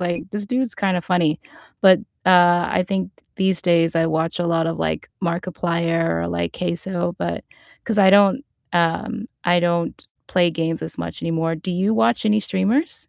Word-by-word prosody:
like, 175 -1 -2
"This 205 0 -4
dude's 250 0 -1
kinda 190 -2 0
funny." 170 -3 +1 0.4
But, 190 -2 +7 0.3
uh, 175 -1 +5
I 180 - +1
think 195 -1 -2 0.3
these 190 -2 +1
days 170 -2 +2
I 165 0 +2
watch 160 +1 -1
a 175 - 0
lot 165 -1 +1
of, 165 - -4
like, 80 -1 -3
Markiplier 170 -1 -1 0.2
or, 85 - -3
like, 85 0 -2
CaseOh, 175 0 -2
but - - -3 0.4
'cause 220 -2 0
I 190 - +6
don't, 200 +6 +5 0.3
um 175 +7 0 0.2
I 175 0 +3
don't 170 -1 -1 0.2
play 175 -2 +2
games 165 0 -2
as 80 - -5
much 85 0 -6
anymore. 165 0 -1
Do 180 +4 -6
you 190 +5 0
watch 120 - +2
any 215 0 +3
streamers? 205 - -1
175 Hz, 175 wpm, -21 LUFS, 165-190 Hz, 0.4 s, But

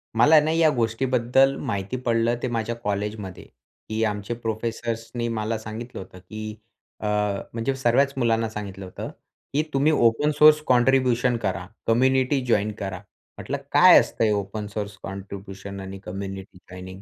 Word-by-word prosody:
मला 150 +8 +7
ना 155 +1 0
या 160 -1 +4
गोष्टीबद्दल 125 +3 +2
माहिती 115 -1 -3
पडलं 115 0 +2
ते - - +1
माझ्या 115 -1 -2
कॉलेजमध्ये 105 -2 -3 0.5
की 110 +1 -1
आमचे 105 +1 -2
प्रोफेसर्सनी 115 +1 -3
मला 110 -1 -2
सांगितलं 110 +3 -7
होतं 95 0 -12
की 110 +2 -7 0.4
अ, - - -6 0.5
म्हणजे 115 +4 -1
सर्वच 135 +2 +2
मुलांना 115 -3 +1
सांगितलं 100 -3 -7
होतं 90 - -7 0.4
की 150 - +3
तुम्ही 140 +3 +3
ओपन 145 +2 +3
सोर्स 155 0 +7
कॉन्ट्रिब्युशन 125 -1 +3
करा. 95 -5 -3 0.2
कम्युनिटी 130 +3 +3
जॉइन 105 -3 +1
करा. 95 -2 -4 0.4
म्हंटलं - - -4
"काय - - +8
असतं - - -1
हे 110 - +3
ओपन 105 +1 -3
सोर्स 105 -1 -5
कॉन्ट्रिब्युशन 100 0 -7
आणि 95 0 -7
कम्युनिटी 95 0 -7
जॉइनिंग?" 95 +1 -9
115 Hz, 145 wpm, -24 LUFS, 100-125 Hz, 0.5 s, काय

